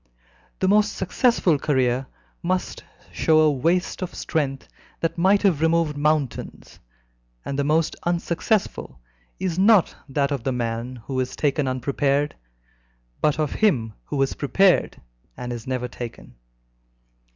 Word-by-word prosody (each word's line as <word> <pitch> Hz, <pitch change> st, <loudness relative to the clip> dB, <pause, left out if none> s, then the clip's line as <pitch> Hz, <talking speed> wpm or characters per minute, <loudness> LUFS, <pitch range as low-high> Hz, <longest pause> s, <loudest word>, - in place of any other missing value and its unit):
The 190 Hz, -, 0 dB
most 210 Hz, +1 st, +3 dB
successful 190 Hz, -, +2 dB
career 130 Hz, -2 st, +1 dB, 0.3 s
must 185 Hz, +1 st, -2 dB, 0.3 s
show 160 Hz, -1 st, +2 dB
a 155 Hz, -1 st, +5 dB
waste 170 Hz, +9 st, 0 dB
of 185 Hz, -, -5 dB
strength 140 Hz, -5 st, -2 dB, 0.3 s
that 165 Hz, -, -1 dB
might 190 Hz, +4 st, +3 dB
have 175 Hz, -7 st, +3 dB
removed 165 Hz, -2 st, +2 dB
mountains, 145 Hz, -4 st, -2 dB, 0.7 s
and 140 Hz, 0 st, -3 dB
the -, -, +2 dB
most 155 Hz, +2 st, +1 dB
unsuccessful 175 Hz, -, -1 dB, 0.4 s
is 185 Hz, -2 st, -2 dB
not 200 Hz, -2 st, +5 dB
that 140 Hz, +1 st, 0 dB
of 135 Hz, -5 st, -2 dB
the 135 Hz, -, 0 dB
man 120 Hz, +1 st, -3 dB
who 130 Hz, -2 st, -2 dB
is 130 Hz, 0 st, -2 dB
taken 145 Hz, -1 st, 0 dB
unprepared, 140 Hz, +3 st, 0 dB, 0.9 s
but 150 Hz, -1 st, +2 dB
of 155 Hz, -2 st, 0 dB
him 125 Hz, -, +1 dB
who 145 Hz, -, -3 dB
has 135 Hz, -, +1 dB
prepared 185 Hz, +6 st, +2 dB, 0.4 s
and 125 Hz, 0 st, -5 dB
is 120 Hz, 0 st, -8 dB
never 125 Hz, -1 st, -2 dB
taken. 120 Hz, -, -9 dB
150 Hz, 135 wpm, -23 LUFS, 130-175 Hz, 0.9 s, a